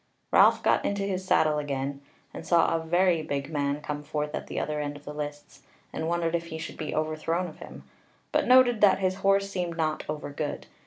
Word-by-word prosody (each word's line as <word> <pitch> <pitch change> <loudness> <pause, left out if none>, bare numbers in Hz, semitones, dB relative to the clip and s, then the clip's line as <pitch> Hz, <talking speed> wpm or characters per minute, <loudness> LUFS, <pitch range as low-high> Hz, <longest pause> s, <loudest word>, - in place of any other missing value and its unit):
Ralph - - +5
got - - +3
into 200 0 -1
his 190 -2 -2
saddle 155 -4 +3
again, 140 -1 -3 0.3
and - - -7
saw 170 -1 +3
a 165 - -2
very 175 0 +2
big 140 -1 -4
man 145 -1 -1
come 150 0 -4
forth 150 0 -3
at - - -4
the - - -3
other 150 0 -2
end 145 0 -3
of 145 - -17
the 150 - -6
lists, 145 0 -7 0.3
and 160 - -3
wondered 170 -1 0
if 170 0 -1
he 160 - -6
should 160 - -7
be 155 -2 -4
overthrown 155 +3 -1
of 155 - -12
him; - - -10 0.5
but - - +1
noted 250 -3 +6
that 195 -2 +6
his 185 -1 0
horse 195 0 +2
seemed 175 -3 -3
not 155 -1 -1
over 150 -1 -4
good. 145 - -4
160 Hz, 215 wpm, -27 LUFS, 150-180 Hz, 0.5 s, noted